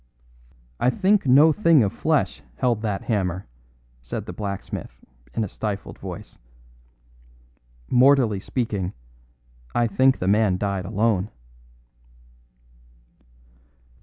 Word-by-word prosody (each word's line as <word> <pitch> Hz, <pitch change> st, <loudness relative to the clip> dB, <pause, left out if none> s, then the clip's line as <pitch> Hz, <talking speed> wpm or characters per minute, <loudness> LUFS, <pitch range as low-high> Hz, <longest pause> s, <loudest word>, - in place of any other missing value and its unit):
"I 125 Hz, -, +3 dB
think 195 Hz, +4 st, +2 dB
no 145 Hz, +5 st, +7 dB
thing 165 Hz, -, +4 dB
of 100 Hz, -, -1 dB
flesh -, -, 0 dB
held 115 Hz, -, 0 dB
that 105 Hz, -3 st, -2 dB
hammer," 95 Hz, -4 st, -1 dB, 0.6 s
said 60 Hz, -, -5 dB
the -, -, -7 dB
blacksmith 100 Hz, -2 st, -6 dB, 0.3 s
in 115 Hz, -, 0 dB
a -, -, -2 dB
stifled 100 Hz, +1 st, -5 dB
voice; -, -, -9 dB, 1.5 s
"mortally 125 Hz, -5 st, +4 dB
speaking, 100 Hz, -5 st, -3 dB, 0.8 s
I 120 Hz, -, +3 dB
think 130 Hz, +5 st, +3 dB
the 90 Hz, -, -3 dB
man 100 Hz, -2 st, +3 dB
died 100 Hz, -2 st, -2 dB
alone." 105 Hz, -1 st, 0 dB
110 Hz, 105 wpm, -23 LUFS, 100-125 Hz, 1.5 s, no